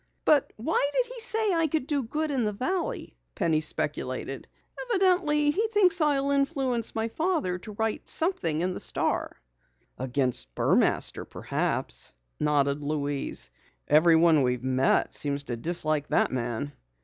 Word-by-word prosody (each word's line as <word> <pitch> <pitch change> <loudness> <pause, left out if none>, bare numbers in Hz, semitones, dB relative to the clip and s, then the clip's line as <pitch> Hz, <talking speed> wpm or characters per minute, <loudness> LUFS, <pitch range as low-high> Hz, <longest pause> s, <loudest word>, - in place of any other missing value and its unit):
"But 295 -3 +3
why 285 +4 0
did - - 0
he - - -6
say 445 -3 +3
I 330 -1 +2
could 310 -2 -1
do 290 -1 0
good 300 +6 -2
in 260 -4 0
the 210 - 0
valley?" 265 - -3 0.2
Penny 160 -2 +1
speculated. 155 - -4 0.4
"Evidently 360 -9 +2
he 430 +8 0
thinks 370 -6 +3
I'll 280 -2 +2
influence 275 -5 0
my 225 0 -1
father 310 - -1
to 210 +4 -10
write 220 +1 -3
something 170 - +2
in 185 +1 -1
the - - -6
Star." - - -2 0.6
"Against 125 - 0
Burmaster - - +1
perhaps," - - -3 0.2
nodded 145 -1 +1
Louise. 145 - -1 0.4
"Everyone 160 0 +5
we've 125 -1 0
met 130 0 +1
seems 140 -1 0
to 120 - -4
dislike 155 +2 -1
that - - +2
man." 120 +2 -3
220 Hz, 140 wpm, -27 LUFS, -, 0.6 s, Everyone